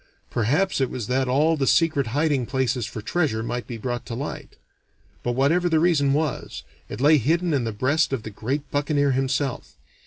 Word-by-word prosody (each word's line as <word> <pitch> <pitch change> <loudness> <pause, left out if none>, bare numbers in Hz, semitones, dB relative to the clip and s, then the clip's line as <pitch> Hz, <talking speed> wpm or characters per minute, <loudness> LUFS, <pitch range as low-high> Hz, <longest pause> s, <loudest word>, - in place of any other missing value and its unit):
Perhaps 140 - +1
it 130 - +1
was 120 -4 -4
that 130 +2 0
all 150 +6 +3
the 135 -3 -1
secret 155 -6 +3
hiding 140 0 0
places 130 -3 -1
for 110 - -7
treasure 140 -7 0
might 120 +1 -4
be 120 - -6
brought 120 +2 -4
to 115 - -4
light; 140 +5 -6 0.7
but 120 - -1
whatever 160 +8 +2
the 160 -1 +3
reason 155 -5 +3
was, 150 0 -2 0.3
it - - -6
lay 150 +3 +5
hidden 165 +6 +1
in 130 -4 +1
the 115 - -2
breast 140 +9 +1
of 130 -5 -2
the 110 - -7
great 135 +8 -4
buccaneer 145 -1 +1
himself. 135 0 -1
135 Hz, 190 wpm, -24 LUFS, 125-155 Hz, 0.7 s, lay